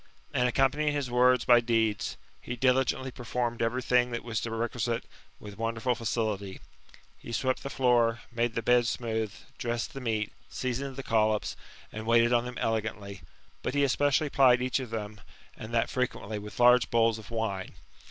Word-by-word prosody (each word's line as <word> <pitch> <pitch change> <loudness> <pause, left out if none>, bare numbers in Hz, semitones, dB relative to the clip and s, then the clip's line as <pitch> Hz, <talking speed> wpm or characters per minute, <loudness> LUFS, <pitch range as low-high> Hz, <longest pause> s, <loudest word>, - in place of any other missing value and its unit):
And, 125 0 +2
accompanying 140 +4 +2
his 140 -4 -2
words 125 0 +4
by 120 -1 +7
deeds, 115 -3 0 0.2
he 120 - -5
diligently 130 +1 +1
performed 120 -1 -3
every 120 +3 0
thing 125 0 +3
that 120 -1 -4
was 115 -2 -3
requisite, 115 +1 -2 0.4
with 105 0 -11
wonderful 115 +2 0
facility; 110 -4 -2 0.6
he - - -9
swept 130 +3 0
the 140 - -5
fioor, 120 -4 +3
made 120 -1 -1
the 115 - -1
beds 120 -1 +4
smooth, 110 -3 -2
^ - - -15 0.2
dressed 120 +6 -2
the 135 - -7
meat, 110 -3 -1 0.2
seasoned 130 +1 -3
the 135 - -6
collops, 110 -2 +1 0.4
and 110 +1 -7
waited 115 +1 +4
on 120 0 +3
them* 125 0 -6
elegantly; 105 -3 -3 0.4
but 130 - -3
he 145 - +3
especially 145 +2 +2
plied 130 -3 +5
each 130 +1 0
of 130 -3 -6
them, 105 -2 -6 0.3
and 110 - -9
that 115 -1 +2
frequently, 110 -4 -3
with 105 +3 -10
large 125 0 +6
bowls 115 -1 +2
of 105 - -12
wine. 110 -5 -3
120 Hz, 170 wpm, -29 LUFS, 110-125 Hz, 0.6 s, by